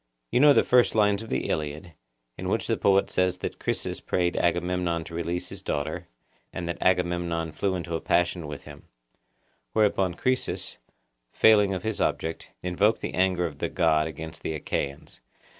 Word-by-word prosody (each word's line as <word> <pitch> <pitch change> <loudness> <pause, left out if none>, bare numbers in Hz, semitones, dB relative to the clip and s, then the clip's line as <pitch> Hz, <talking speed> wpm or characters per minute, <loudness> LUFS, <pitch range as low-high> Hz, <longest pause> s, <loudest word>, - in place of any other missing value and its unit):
You - - +3
know 145 +2 +8
the - - +5
first 125 -2 +4
lines 105 -1 +3
of 115 - -9
the - - -1
Iliad, 75 +2 -3 0.4
in - - -4
which - - 0
the - - +1
poet 100 0 +3
says 90 0 +1
that - - -5
Chryses - - -2
prayed 90 -1 0
Agamemnon 90 -1 0
to 85 - -11
release 85 +2 -3
his 100 0 -8
daughter, 75 -4 -3 0.4
and 90 -2 -5
that 85 - -4
Agamemnon 85 -2 +1
flew 95 +4 -1
into 85 -1 -4
a 80 - -3
passion 85 -2 +1
with 75 -1 -7
him; - - -13 0.9
whereupon 100 -4 +2
Chryses, 130 +6 -1 0.5
failing 105 -3 +5
of 95 - -5
his 110 -1 -2
object, 80 0 -2
invoked 95 +5 +2
the - - -4
anger 90 -1 +2
of 75 -4 -6
the - - -1
God 75 0 +2
against 80 +1 -8
the 80 - -3
Achaeans. 70 -2 -4
90 Hz, 175 wpm, -26 LUFS, 80-95 Hz, 0.9 s, know